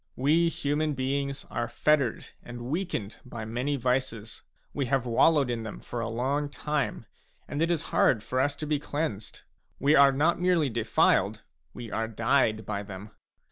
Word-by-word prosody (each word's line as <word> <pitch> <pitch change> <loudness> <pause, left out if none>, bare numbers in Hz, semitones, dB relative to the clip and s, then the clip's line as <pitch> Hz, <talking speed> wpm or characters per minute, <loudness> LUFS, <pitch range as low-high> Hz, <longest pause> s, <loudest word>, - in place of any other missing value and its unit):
We 160 +6 +3
human 150 -1 -1
beings 140 +1 -2
are 120 - -2
fettered 140 -5 +1
and 120 0 -9
weakened 130 - -3
by 115 -3 -7
many 125 +6 -1
vices; 125 -4 -2 0.3
we 140 -3 -1
have 135 -1 +1
wallowed 135 +3 +3
in 115 -1 -2
them 110 -1 -7
for 120 - -6
a - - -2
long 135 +5 -1
time, 150 0 -2 0.4
and 145 - -3
it 165 - +2
is 165 -3 +1
hard 110 -4 +3
for 130 - -2
us 145 +2 +1
to 155 - -5
be 150 -1 0
cleansed. 145 -8 -4 0.3
We 145 +3 +3
are 140 0 +7
not 160 +6 +1
merely 175 -7 +2
defiled; 115 -1 +2 0.3
we 120 -3 -7
are 115 0 -1
dyed 110 -2 +1
by 100 -1 -3
them. 100 +1 -9
135 Hz, 170 wpm, -28 LUFS, 115-150 Hz, 0.4 s, are